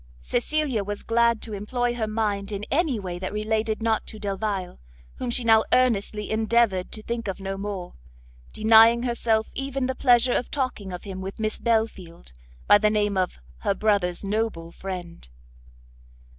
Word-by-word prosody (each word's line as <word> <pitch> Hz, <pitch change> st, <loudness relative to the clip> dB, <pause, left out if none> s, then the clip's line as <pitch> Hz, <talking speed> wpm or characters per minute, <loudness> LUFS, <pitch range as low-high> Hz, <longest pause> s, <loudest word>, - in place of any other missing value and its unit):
Cecilia 250 Hz, -, -1 dB
was 205 Hz, +1 st, -5 dB
glad 235 Hz, -1 st, +2 dB
to 220 Hz, -, -6 dB
employ 240 Hz, +4 st, -1 dB
her 230 Hz, -2 st, -2 dB
mind 210 Hz, -2 st, -1 dB
in 205 Hz, 0 st, -4 dB
any 285 Hz, -6 st, +1 dB
way 180 Hz, -3 st, -5 dB
that 185 Hz, +1 st, -4 dB
related 215 Hz, +1 st, -1 dB
not 225 Hz, -1 st, 0 dB
to 220 Hz, -, -6 dB
Delvile, 200 Hz, -2 st, -3 dB, 0.4 s
whom 250 Hz, -, -3 dB
she 240 Hz, +1 st, 0 dB
now 225 Hz, -1 st, +5 dB
earnestly 215 Hz, -4 st, +1 dB
endeavoured 220 Hz, -4 st, +1 dB
to 215 Hz, -, -5 dB
think 235 Hz, -1 st, -4 dB
of 195 Hz, -, -4 dB
no 195 Hz, 0 st, -4 dB
more, 195 Hz, -2 st, -5 dB, 0.6 s
denying 225 Hz, +2 st, +6 dB
herself 230 Hz, -2 st, 0 dB
even 275 Hz, -1 st, -2 dB
the 260 Hz, -, -1 dB
pleasure 245 Hz, -1 st, +4 dB
of -, -, -1 dB
talking 255 Hz, -8 st, -3 dB
of 180 Hz, -, -7 dB
him 190 Hz, -2 st, -6 dB
with 190 Hz, +1 st, -6 dB
Miss 215 Hz, -1 st, -2 dB
Belfield, 200 Hz, -, -2 dB, 0.3 s
by 205 Hz, -, +7 dB
the 210 Hz, 0 st, +3 dB
name 210 Hz, -1 st, +1 dB
of 185 Hz, -1 st, -1 dB, 0.2 s
her 195 Hz, -, 0 dB
brother's 200 Hz, -4 st, +1 dB
noble 205 Hz, -5 st, -2 dB
friend. 175 Hz, -, -7 dB
215 Hz, 165 wpm, -25 LUFS, 195-235 Hz, 0.6 s, by